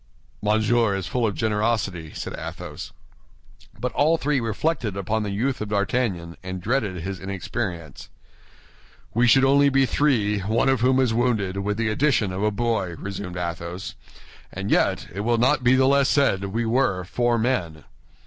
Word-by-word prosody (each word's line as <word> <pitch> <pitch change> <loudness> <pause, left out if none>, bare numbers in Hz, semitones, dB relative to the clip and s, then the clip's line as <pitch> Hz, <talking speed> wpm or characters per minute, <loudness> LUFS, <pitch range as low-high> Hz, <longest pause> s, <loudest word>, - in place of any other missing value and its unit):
"Monsieur 110 0 +2
is 95 -2 -3
full 120 +4 0
of 100 - -3
generosity," 105 -7 -1
said - - -5
Athos. - - -7 0.9
But 125 +3 -2
all 160 +3 +3
three 145 -2 0
reflected 115 - -2
upon 105 +3 -1
the 105 - -3
youth 120 +6 -1
of 105 - -4
D'Artagnan, 100 -5 -1
and 95 0 -5
dreaded 100 -4 -1
his 95 0 -5
inexperience. 95 - -5 1.0
"We 120 +2 +3
should 135 +3 +6
only 140 +1 +5
be 135 0 +3
three, 115 -7 +1
one 110 +7 +1
of 135 -3 +2
whom 130 +1 +3
is 125 -4 +2
wounded, 110 -6 0
with 105 +1 -2
the 115 -1 0
addition 110 -4 +1
of 95 +1 -4
a 105 - +2
boy," 105 -5 -1
resumed 95 -2 -6
Athos; 85 +1 -5 0.6
"and 95 +2 -4
yet - - +2
it 95 - -6
will 120 +3 +1
not 130 +3 +2
be 125 +2 +5
the 130 0 +4
less 140 0 +3
said 100 -9 +2
we 115 +4 -2
were 115 -6 +1
four 120 +6 0
men." 90 - -1
110 Hz, 170 wpm, -24 LUFS, 95-125 Hz, 1.0 s, should